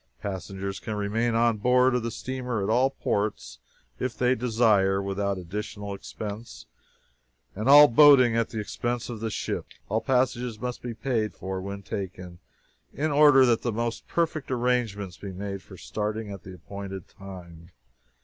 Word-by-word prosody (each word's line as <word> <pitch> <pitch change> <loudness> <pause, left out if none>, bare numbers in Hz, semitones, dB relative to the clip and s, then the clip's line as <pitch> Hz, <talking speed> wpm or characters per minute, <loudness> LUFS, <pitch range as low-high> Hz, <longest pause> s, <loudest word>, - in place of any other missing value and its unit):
Passengers 95 0 -5
can 110 - -5
remain 110 +3 0
on 115 -1 +3
board 125 +3 +4
of 125 - +1
the 115 - -2
steamer, 125 -3 -3
at 100 - 0
all 125 +4 +4
ports, 100 - -2 0.4
if 130 - -3
they 125 0 +3
desire, 110 -5 +2
without 100 0 -2
additional 100 +3 -5
expense, 105 +3 -7 0.9
and 110 +6 -2
all 145 +1 +10
boating 130 -2 +7
at 115 -1 +1
the 110 - -4
expense 120 +3 -3
of 115 - -6
the 110 0 -2
ship. - - -3 0.2
All 110 +3 0
passages 125 -3 0
must 125 0 -4
be 120 -2 -5
paid 115 -2 -1
for 95 0 -5
when 100 +1 -6
taken, 95 -4 -6 0.5
in 155 +2 -1
order 145 -2 +7
that 120 -2 +2
the 120 - -1
most 115 +1 -3
perfect 165 -3 -1
arrangements 120 -7 -1
be 100 - -7
made 100 +1 -5
for - - -13
starting 105 0 -4
at 100 -2 -8
the 95 -1 -10
appointed 95 0 -8
time. 85 -4 -12
110 Hz, 160 wpm, -26 LUFS, 100-125 Hz, 0.9 s, all